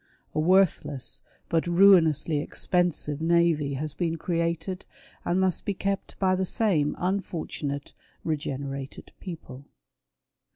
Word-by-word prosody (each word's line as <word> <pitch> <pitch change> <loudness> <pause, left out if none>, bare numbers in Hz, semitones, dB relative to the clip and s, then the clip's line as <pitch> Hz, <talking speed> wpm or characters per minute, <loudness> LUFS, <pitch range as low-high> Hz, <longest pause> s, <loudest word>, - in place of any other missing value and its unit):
A - - 0
worthless 170 -6 +2 0.3
but 165 0 0
ruinously 170 -4 +5
expensive 160 -2 -1
navy 165 -4 +2
has 150 +2 -3
been 165 0 -1
created 170 +2 -2 0.4
and 175 +2 +1
must 190 -2 +1
be 200 - -2
kept 195 +1 -3
by 190 -1 +2
the 190 - 0
same 180 -7 +1
unfortunate 165 -6 -3 0.2
" - - -37
regenerated 140 -1 -5
" - - -45
people. 145 -7 -8
170 Hz, 120 wpm, -27 LUFS, 150-185 Hz, 0.4 s, ruinously